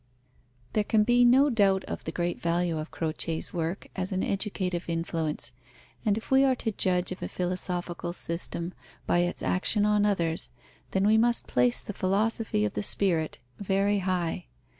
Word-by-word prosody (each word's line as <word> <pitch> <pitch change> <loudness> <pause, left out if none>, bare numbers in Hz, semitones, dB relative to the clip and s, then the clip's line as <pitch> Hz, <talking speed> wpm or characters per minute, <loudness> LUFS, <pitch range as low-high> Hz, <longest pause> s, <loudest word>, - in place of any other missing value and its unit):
There 215 - +2
can 210 +1 +3
be 245 +2 +4
no 265 +4 +5
doubt 195 -4 +3
of - - -6
the 160 - -3
great 175 +1 -2
value 170 -1 0
of 155 - -5
Croce's 160 0 -2
work 170 +2 -3
as 190 0 -2
an 190 -1 0
educative 190 -3 -2
influence, 165 -3 -1 0.5
and 210 -1 +2
if 225 - -8
we 265 +1 +6
are 265 -1 +3
to 225 -2 -2
judge 180 -2 +1
of 185 - -6
a - - -4
philosophical 180 -1 -2
system 170 0 -3 0.3
by 175 - +2
its 175 0 -1
action 205 +3 +2
on 210 -1 +3
others, 170 -5 0 0.4
then 190 +1 +1
we 220 +1 +5
must 235 +1 +2
place 125 -1 +2
the 210 - -7
Philosophy 200 - +1
of 105 - -2
the 105 - -2
Spirit 165 - 0 0.2
very 200 +1 +1
high. 180 - -1
185 Hz, 170 wpm, -28 LUFS, 170-210 Hz, 0.5 s, we